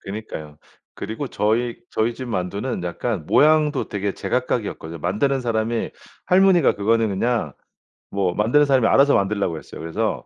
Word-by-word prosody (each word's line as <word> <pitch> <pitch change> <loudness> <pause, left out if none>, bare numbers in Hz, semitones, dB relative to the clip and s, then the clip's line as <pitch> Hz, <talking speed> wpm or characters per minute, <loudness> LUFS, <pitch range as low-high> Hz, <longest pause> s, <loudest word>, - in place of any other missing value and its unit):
그니까요. 95 -8 -8 0.4
그리고 115 +7 -5
저희 115 +3 0
저희 115 +2 0
집 130 - -7
만두는 100 +2 -3
약간 90 0 -3
모양도 150 -2 +3
되게 100 -1 -2
제각각이었거든요. 105 -9 -3
만드는 105 - 0
사람이 115 -1 -1 0.3
할머니가 185 -4 +4
그거는 115 +2 +1
그냥 105 - -1 0.6
뭐 95 -3 0
만드는 120 +10 +3
사람이 135 -4 +3
알아서 140 +1 +5
만들라고 100 -4 0
했어요. - - -10
그래서 80 0 -2
110 Hz, 380 characters per minute, -22 LUFS, 100-130 Hz, 0.6 s, 알아서